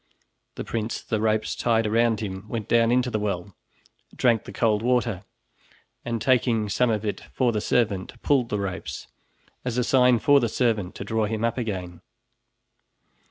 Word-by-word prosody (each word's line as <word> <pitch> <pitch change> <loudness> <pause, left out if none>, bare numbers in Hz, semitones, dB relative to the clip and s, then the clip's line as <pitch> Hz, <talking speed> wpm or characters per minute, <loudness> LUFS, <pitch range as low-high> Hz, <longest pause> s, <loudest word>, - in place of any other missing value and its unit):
The - - -5
prince, 115 0 -3
the 110 -2 -2
ropes 110 0 0
tied 115 -2 +1
around 115 0 +2
him, 95 -1 -6
went 110 -3 -4
down 115 0 +3
into 125 0 +2
the 110 - -1
well, 100 -3 -3 0.6
drank 115 -4 +2
the - - -8
cold 110 -3 +1
water, 115 -5 0 0.8
and 115 -1 -2
taking 115 -4 +2
some 125 +4 +2
of 110 -1 -1
it 105 - -3
for 125 -2 +2
the 105 -2 -1
servant, 105 -6 0
pulled 130 -5 +2
the 105 - -1
ropes, 100 -2 -5 0.6
as 125 -1 -3
a 125 - +2
sign 125 -1 +4
for 140 +5 +5
the 120 -3 0
servant 110 -7 0
to - - -6
draw 110 +2 0
him 110 +1 -1
up 115 +2 -1
again. 90 -7 -5
115 Hz, 170 wpm, -25 LUFS, 105-120 Hz, 0.8 s, for